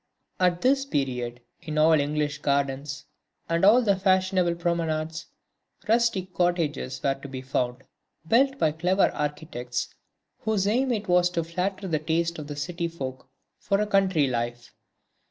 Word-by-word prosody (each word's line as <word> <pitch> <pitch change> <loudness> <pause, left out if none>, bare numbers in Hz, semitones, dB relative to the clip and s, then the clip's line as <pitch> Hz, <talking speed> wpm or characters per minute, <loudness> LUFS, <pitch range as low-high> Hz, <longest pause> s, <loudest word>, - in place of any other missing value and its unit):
At 180 -1 +2
this 270 +2 +3
period, 125 - -2 0.2
in 155 -3 -5
all 155 +1 +5
the 155 -2 +5
English 145 0 -1
gardens 140 0 -1 0.4
and 165 +1 0
all 225 +6 +7
the 200 -3 +3
fashionable 185 -2 +2
promenades, 165 -2 -2 0.6
rustic 220 -5 +1
cottages 160 -7 0
were 135 - +3
to 135 +1 -10
be 130 -1 -7
found, 125 -1 -2 0.4
built 270 +6 +3
by 155 - +2
clever 180 +5 +2
architects, 145 -5 -4 0.5
whose 215 -3 0
aim 250 +5 +2
it 215 -3 -2
was 180 0 +4
to 170 -2 -1
flatter 185 +4 -3
the 160 -4 0
taste 165 +2 -1
of 150 - -7
the 145 - -6
city 170 +4 -3
folk 130 -6 -7 0.3
for 200 -1 0
a 210 - +2
country 190 -7 +3
life. 120 -1 -3
165 Hz, 155 wpm, -26 LUFS, 145-190 Hz, 0.6 s, all